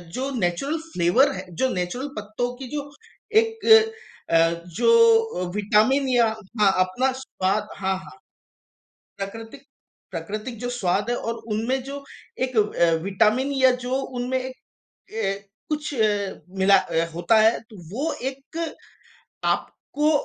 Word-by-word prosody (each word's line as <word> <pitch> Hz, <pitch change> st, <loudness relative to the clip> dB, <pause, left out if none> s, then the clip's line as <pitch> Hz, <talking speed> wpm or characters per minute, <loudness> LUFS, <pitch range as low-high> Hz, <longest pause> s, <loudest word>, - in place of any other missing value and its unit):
जो 265 Hz, +2 st, -2 dB
natural 195 Hz, -, 0 dB, 0.2 s
flavour 185 Hz, +12 st, +4 dB
है, 185 Hz, -, -6 dB
जो 260 Hz, -, +1 dB
नेचुरल 185 Hz, +10 st, -3 dB
पत्तों 215 Hz, +4 st, -3 dB
की 265 Hz, -1 st, -7 dB
जो 285 Hz, -1 st, -4 dB, 0.5 s
एक 450 Hz, 0 st, -5 dB, 0.7 s
अ, 165 Hz, -, +6 dB, 0.4 s
जो 455 Hz, -, +4 dB
विटामिन 215 Hz, +7 st, +3 dB
या 240 Hz, -2 st, +4 dB, 0.4 s
अपना 190 Hz, +8 st, +1 dB
स्वाद 210 Hz, -4 st, -1 dB
हाँ, 190 Hz, -1 st, 0 dB
हाँ। 190 Hz, -, -12 dB, 1.0 s
प्राकृतिक-प्राकृतिक 225 Hz, -2 st, -8 dB
जो 245 Hz, -, -3 dB
स्वाद 205 Hz, -2 st, 0 dB
है 240 Hz, -, +1 dB
और 230 Hz, -, -3 dB, 0.2 s
उनमें 245 Hz, +5 st, 0 dB
जो 280 Hz, +1 st, -7 dB, 0.4 s
एक 255 Hz, -2 st, -6 dB
अ, 205 Hz, -5 st, +3 dB
विटामिन 215 Hz, +8 st, +2 dB
या 260 Hz, -1 st, +5 dB
जो 255 Hz, -, -2 dB
उनमें 255 Hz, 0 st, -2 dB
एक 255 Hz, 0 st, -6 dB, 0.6 s
ए 205 Hz, -3 st, 0 dB, 0.3 s
कुछ 300 Hz, -1 st, -2 dB
ए 220 Hz, -4 st, +3 dB, 0.5 s
मिला 195 Hz, +1 st, +6 dB, 0.4 s
होता 175 Hz, +6 st, +2 dB
है। 220 Hz, +2 st, +4 dB
तो 215 Hz, -, -12 dB, 0.2 s
वो 290 Hz, +8 st, -1 dB, 0.2 s
एक 275 Hz, +4 st, -9 dB, 0.9 s
आपको 300 Hz, +1 st, 0 dB
240 Hz, 125 wpm, -24 LUFS, 200-270 Hz, 1.0 s, अ